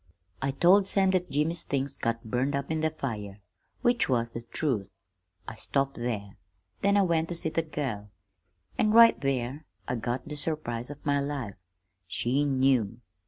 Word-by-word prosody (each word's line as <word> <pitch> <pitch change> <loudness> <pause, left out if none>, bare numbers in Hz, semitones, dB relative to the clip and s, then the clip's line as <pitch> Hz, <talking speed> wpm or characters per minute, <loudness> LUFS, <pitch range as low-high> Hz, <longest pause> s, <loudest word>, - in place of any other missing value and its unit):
"I 135 - 0
told 180 +8 +5
Sam 195 -1 +3
that 180 -1 0
Jimmy's 155 +4 0
things 140 0 -2
got 115 0 -2
burned 125 +5 0
up 140 +2 -3
in 160 -1 0
the 160 - +2
fire 105 -9 -5 0.4
which 240 - +3
was 120 -2 +1
the 115 - -5
truth. 115 -5 -2 0.6
I 110 - -6
stopped 135 +4 -1
there. 105 -4 -4 0.4
Then 200 +1 +3
I 200 - +5
went 165 -3 +1
to 175 - -2
see 165 -1 -1
the 165 - 0
girl 135 -10 -4 0.7
an' 215 0 +3
right 230 0 +7
there 135 +1 -1 0.2
I - - -1
got 120 +3 -3
the 150 - -5
surprise 140 -6 -2
of 145 -1 -10
my 145 -1 +2
life. 140 -7 -3 0.5
She 130 +8 +1
knew. 130 -5 +2
140 Hz, 170 wpm, -28 LUFS, 120-160 Hz, 0.7 s, right